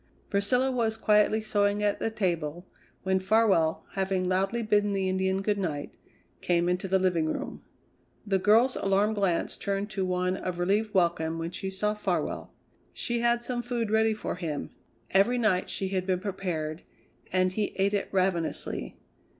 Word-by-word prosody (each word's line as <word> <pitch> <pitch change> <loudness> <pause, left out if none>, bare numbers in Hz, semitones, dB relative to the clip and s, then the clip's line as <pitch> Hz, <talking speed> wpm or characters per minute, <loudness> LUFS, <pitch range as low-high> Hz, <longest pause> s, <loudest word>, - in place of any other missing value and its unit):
Priscilla 250 +7 +2
was 225 -3 0
quietly 215 0 +3
sewing 205 -1 +1
at 205 -1 +1
the - - 0
table 175 -5 -2 0.4
when 190 0 +2
Farwell, 190 -5 +2
having 190 -1 -1
loudly 195 +6 0
bidden 205 -1 +2
the 195 -1 0
Indian 190 +1 0
good 205 0 0
night, 150 -6 -3 0.5
came 175 -1 +1
into 180 +2 0
the 190 +1 +3
living 180 -4 +1
room. - - -5 0.6
The 195 -2 +1
girl's 225 +7 +4
alarmed 200 +2 +2
glance 190 -4 0
turned 200 +1 -3
to 195 - -1
one 180 0 0
of 185 -2 -4
relieved 205 +4 0
welcome 170 -3 +1
when 165 +1 -4
she 190 +2 -4
saw 210 +2 0
Farwell. 210 - -2 0.4
She 240 0 -2
had 235 0 +2
some 240 0 -2
food 240 -3 -2
ready 220 0 +3
for 210 - -4
him 160 -5 -4 0.4
every 200 +6 +4
night 210 -6 +1
she 190 - -2
had 185 -1 -2
been 185 -1 +1
prepared 180 -5 -3 0.5
and 185 0 +2
he 210 +1 -1
ate 195 +1 +1
it 200 - -1
ravenously. 185 -3 -1
195 Hz, 165 wpm, -28 LUFS, 180-210 Hz, 0.6 s, girl's